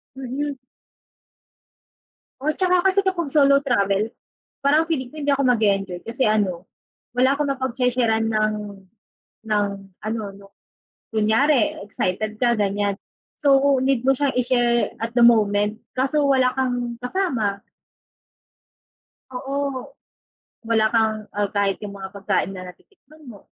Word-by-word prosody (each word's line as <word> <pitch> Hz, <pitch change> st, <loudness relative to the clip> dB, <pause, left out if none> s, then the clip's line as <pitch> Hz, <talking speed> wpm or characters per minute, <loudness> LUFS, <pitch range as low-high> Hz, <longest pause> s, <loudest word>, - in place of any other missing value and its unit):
Mhm. 270 Hz, +2 st, -4 dB, 1.8 s
Oh, 305 Hz, +2 st, 0 dB
'tsaka, 365 Hz, -1 st, +2 dB
kasi, 390 Hz, +1 st, +2 dB
kapag 360 Hz, -5 st, -1 dB
solo 280 Hz, -1 st, +6 dB
travel, 210 Hz, -5 st, 0 dB, 0.5 s
parang 305 Hz, +4 st, +3 dB
feeling 260 Hz, -7 st, -2 dB
ko -, -, -15 dB
hindi 285 Hz, 0 st, 0 dB
ako 275 Hz, -, 0 dB
mag-e-enjoy 200 Hz, -7 st, +1 dB
kasi 250 Hz, +3 st, -1 dB
ano, 200 Hz, -4 st, 0 dB, 0.4 s
wala 260 Hz, +3 st, +3 dB
akong 285 Hz, -1 st, 0 dB
mapagshe-sheran 245 Hz, -4 st, 0 dB
ng 215 Hz, 0 st, +1 dB, 0.9 s
ng, 210 Hz, -1 st, +1 dB, 0.4 s
ano, 220 Hz, +1 st, -3 dB
'no 200 Hz, 0 st, -15 dB, 0.7 s
kunyari 220 Hz, +4 st, +2 dB
excited 215 Hz, +3 st, -3 dB
ka 240 Hz, -2 st, +3 dB
ganyan, 200 Hz, 0 st, 0 dB, 0.4 s
so, 280 Hz, -1 st, +4 dB
need 260 Hz, -2 st, +1 dB
mo 265 Hz, 0 st, +2 dB
siyang 285 Hz, -2 st, 0 dB
i-share 240 Hz, -1 st, +2 dB
at 230 Hz, +1 st, -4 dB
the 240 Hz, -, +2 dB
moment, 210 Hz, -2 st, +4 dB, 0.2 s
kaso 280 Hz, +3 st, +1 dB
wala 260 Hz, -2 st, +4 dB
kang 245 Hz, -2 st, -1 dB
kasama. 245 Hz, -, -1 dB, 1.7 s
Oo, 270 Hz, +1 st, -3 dB, 0.8 s
wala 225 Hz, -1 st, +2 dB
kang, 220 Hz, -2 st, 0 dB
ah, 205 Hz, -, +2 dB
kahit 200 Hz, -1 st, +1 dB
yung 200 Hz, -, -7 dB
mga 190 Hz, -1 st, -7 dB
pagkain 195 Hz, -1 st, 0 dB
na 185 Hz, -1 st, -8 dB
natitikman 310 Hz, -7 st, -19 dB
mo, 205 Hz, -4 st, -11 dB
240 Hz, 125 wpm, -22 LUFS, 215-275 Hz, 1.8 s, solo